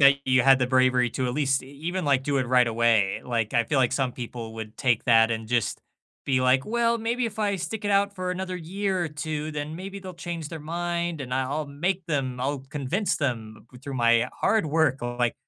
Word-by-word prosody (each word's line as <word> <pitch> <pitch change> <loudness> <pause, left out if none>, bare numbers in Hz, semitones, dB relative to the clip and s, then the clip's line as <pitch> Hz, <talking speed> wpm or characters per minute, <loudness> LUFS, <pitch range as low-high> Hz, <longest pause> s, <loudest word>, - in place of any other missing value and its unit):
that 140 0 +7
you 130 -1 +4
had 135 0 +6
the 125 - +1
bravery 130 -1 +3
to 130 - -2
at 125 - -1
least 135 -2 +1
e 130 - -13
even, 175 +1 -2
like, 135 -2 +3
do 145 -1 0
it 130 - 0
right 125 0 +4
away. 115 -4 +2
Like, 115 -3 -1
I 120 - +3
feel 135 +4 0
like 130 -1 +3
some 130 -2 0
people 120 -2 -7
would 110 -1 -8
take 120 -5 +1
that 115 -2 +5
and 110 -1 -3
just 120 -4 0 0.5
be 130 -2 +2
like, 130 +1 +3
"Well, 235 +1 +1
maybe 235 +2 -1
if 220 -2 -4
I 205 -2 +1
stick 185 +5 -5
it 205 - 0
out 200 0 +2
for 185 -1 -3
another 185 0 -3
year 185 +2 -2
or - - -2
two, 150 0 -4
then 150 +1 -5
maybe 195 +2 -7
they'll 185 -1 -8
change 170 -2 -5
their 160 -2 -6
mind 170 0 -2
and 125 -2 -5
I 130 - +1
I'll 145 +3 -2
make 175 +6 -2
them 135 -5 -1
I'll 135 +2 -1
convince 150 +9 -1
them 110 -6 -3 0.2
through 140 -1 -6
my 120 0 +3
hard 220 -8 +2
work," 155 -3 +2
or 120 0 -4
like 120 -1 +1
140 Hz, 235 wpm, -26 LUFS, 125-175 Hz, 0.5 s, that